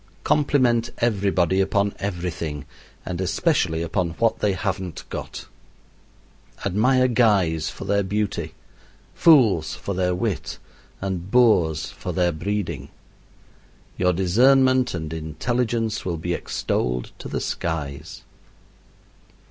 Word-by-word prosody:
Compliment 125 -5 +2
everybody 95 -5 +1
upon 100 +1 +1
everything, 85 -6 -4 0.4
and 90 0 -4
especially 95 - +1
upon 85 +1 -1
what 115 -1 +1
they 105 -2 +1
haven't 95 -2 -3
got. - - -6 1.2
Admire 130 +7 +3
guys 100 -10 +2
for - - -8
their 100 0 +2
beauty, 100 +1 -2 0.6
fools 120 - +4
for 100 - -5
their 90 -1 0
wit, 100 +1 -3 0.4
and 95 -2 -3
boors 90 -10 +3
for - - -6
their 90 -1 +2
breeding. 100 +5 -3 1.1
Your 90 0 +2
discernment 130 +7 +3
and 80 -2 -5
intelligence 110 +8 -2
will 85 -3 -2
be 85 +2 -2
extolled 60 -6 -2
to - - -7
the - - -3
skies. 75 -2 -4
95 Hz, 110 wpm, -23 LUFS, 85-115 Hz, 1.2 s, fools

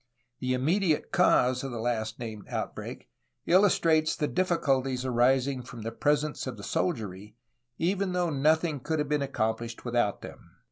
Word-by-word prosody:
The 130 0 0
im 125 +1 -2
mediate 170 -2 +1
cause 130 -9 +3
of 135 - -3
the 120 - -5
last 110 -1 -2
named 110 -4 -7
outbreak - - -5 0.4
illustrates 165 -4 +4
the 150 - -1
difficulties 135 -8 0
arising 130 +2 +2
from 125 -2 -10
the 115 - -3
presence 150 +1 0
of 125 -4 -5
the 100 - -10
soldiery, 105 - -3 0.4
even 190 +2 0
though 175 -2 0
nothing 155 +2 +2
could 160 +5 -2
have 150 -1 -1
been 150 -1 +1
accomplished 115 -3 -2
without 120 -4 0
them. - - -12
135 Hz, 155 wpm, -28 LUFS, 120-160 Hz, 0.4 s, illustrates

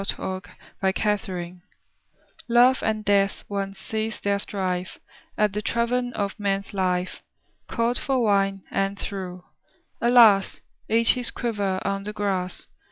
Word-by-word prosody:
THE 190 -1 -3 0.4
EXPLANATION 190 -3 -1 0.9
Love 245 +2 +5
and 215 -1 -1
Death 200 -1 +2
once 195 -1 -3
ceased 220 +2 -4
their 200 0 +1
strife 185 -2 -3 0.4
At 210 -2 +2
the 210 - -1
Tavern 245 +3 0
of 200 +1 -3
Man's 200 -1 -1
Life. 185 -2 -1 0.5
Called 235 +1 0
for 265 -3 0
wine, 195 -2 +2
and 195 0 0
threw 185 -3 -5 0.3
— - - -41
alas! 230 -5 +6 0.2
— - - -41
Each 230 +1 +5
his 250 -2 -2
quiver 205 -6 -1
on 195 0 -1
the 210 +1 -5
grass. 190 -3 -2
200 Hz, 135 wpm, -25 LUFS, 190-220 Hz, 0.9 s, alas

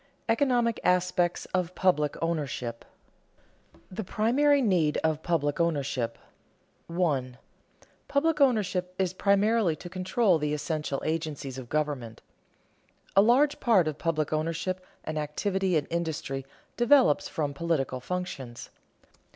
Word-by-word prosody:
ECONOMIC 240 -1 +2
ASPECTS 180 -1 +1
OF 180 -1 -1
PUBLIC 150 -6 +1
OWNERSHIP 135 -8 -3
[Sidenote: - - -32
The 220 - -3
primary 255 +9 +3
need 180 - +2
of 160 -1 +1
public 160 -4 0
ownership] 140 -8 -1 0.7
1. 145 -8 -1 0.7
Public 300 +2 +1
ownership 195 -8 +1
is 185 -2 0
primarily 200 -1 +2
to 175 +3 -10
control 185 0 +2
the 150 0 -1
essential 150 -2 -3
agencies 155 -4 -3
of 120 -2 -10
government. 145 -7 -2 0.9
A 195 - +8
large 265 +7 +4
part 200 -9 +4
of 155 -1 -3
public 155 -3 -1
ownership 165 +4 -2 0.2
and 155 0 -3
activity 185 +5 -1
in 145 - -1
industry 150 -5 -3 0.3
develops 240 - +4
from 145 -3 -2
political 140 -4 -1
functions. 135 -5 -5
170 Hz, 120 wpm, -28 LUFS, 150-195 Hz, 0.9 s, A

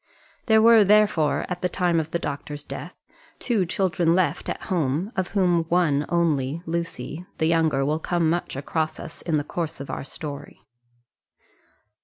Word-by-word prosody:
There 220 -1 +5
were, 230 -2 +7
therefore, 205 -7 +3
at 180 -1 -5
the 180 - 0
time 175 -2 +1
of 160 0 -3
the 170 - -1
doctor's 145 -2 -5
death - - -8 0.4
two 215 -8 0
children 175 -2 +1
left 185 -1 0
at - - -3
home, 165 - -1
of 190 -2 -1
whom 175 -3 +3
one 165 -4 +1
only, 160 -3 0
Lucy, 165 -1 -4
the 160 - +1
younger, 160 -4 +2
will 155 +2 0
come 170 0 0
much 170 -2 -1
across 155 +3 -2
us 160 - -9
in 160 -3 0
the 145 - -1
course 165 +1 -4
of 140 - -6
our - - -4
story. 140 0 -8
165 Hz, 165 wpm, -24 LUFS, 150-180 Hz, 0.4 s, were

